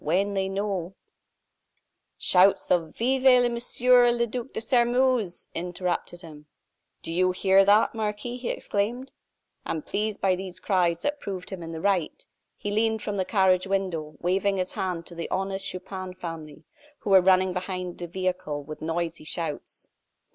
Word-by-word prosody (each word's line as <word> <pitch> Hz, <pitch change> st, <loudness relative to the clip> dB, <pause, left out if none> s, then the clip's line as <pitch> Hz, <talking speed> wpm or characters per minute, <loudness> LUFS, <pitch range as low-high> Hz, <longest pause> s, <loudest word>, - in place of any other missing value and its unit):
"When 190 Hz, +6 st, +1 dB
they 190 Hz, -1 st, -1 dB
know 195 Hz, -2 st, -3 dB, 0.6 s
" -, -, -35 dB, 0.2 s
Shouts 190 Hz, +2 st, +4 dB
of 165 Hz, -3 st, +1 dB
"Vive 250 Hz, 0 st, +4 dB
Monsieur 245 Hz, +1 st, +4 dB
le 235 Hz, 0 st, +1 dB
Duc 245 Hz, +2 st, -6 dB
de -, -, -4 dB
Sairmeuse!" 240 Hz, -3 st, +2 dB
interrupted 175 Hz, 0 st, -3 dB
him. 150 Hz, -2 st, -12 dB, 0.6 s
"Do 165 Hz, -, -5 dB
you 185 Hz, +2 st, +3 dB
hear 190 Hz, +1 st, +4 dB
that, 205 Hz, +2 st, +4 dB
Marquis?" 220 Hz, +2 st, -3 dB
he 250 Hz, -1 st, -4 dB
exclaimed. 240 Hz, +6 st, -2 dB, 0.5 s
And 160 Hz, -2 st, -4 dB
pleased 210 Hz, 0 st, -2 dB
by 190 Hz, -1 st, +2 dB
these 185 Hz, -1 st, -6 dB
cries 180 Hz, -4 st, +1 dB
that 290 Hz, 0 st, -1 dB
proved 190 Hz, -5 st, -6 dB
him 190 Hz, -2 st, -6 dB
in 165 Hz, 0 st, -7 dB
the 160 Hz, -1 st, -6 dB
right, 190 Hz, -5 st, 0 dB, 0.3 s
he 205 Hz, -, -4 dB
leaned 220 Hz, +1 st, +1 dB
from 205 Hz, -1 st, -3 dB
the 190 Hz, -, 0 dB
carriage 190 Hz, -2 st, +3 dB
window, 180 Hz, -6 st, -2 dB
waving 195 Hz, +3 st, +1 dB
his 185 Hz, 0 st, -2 dB
hand 180 Hz, -3 st, -3 dB
to -, -, -11 dB
the 170 Hz, 0 st, -5 dB
honest 195 Hz, +1 st, -1 dB
Chupin 185 Hz, 0 st, -5 dB
family, 160 Hz, -3 st, -8 dB, 0.4 s
who 200 Hz, -, -3 dB
were 190 Hz, -1 st, +8 dB
running 185 Hz, 0 st, +3 dB
after 180 Hz, -1 st, -3 dB
the 175 Hz, -, -7 dB
vehicle 180 Hz, -5 st, -3 dB
with 155 Hz, +2 st, -9 dB
noisy 165 Hz, 0 st, -3 dB
shouts. 160 Hz, -1 st, -5 dB
190 Hz, 160 wpm, -26 LUFS, 175-210 Hz, 0.6 s, were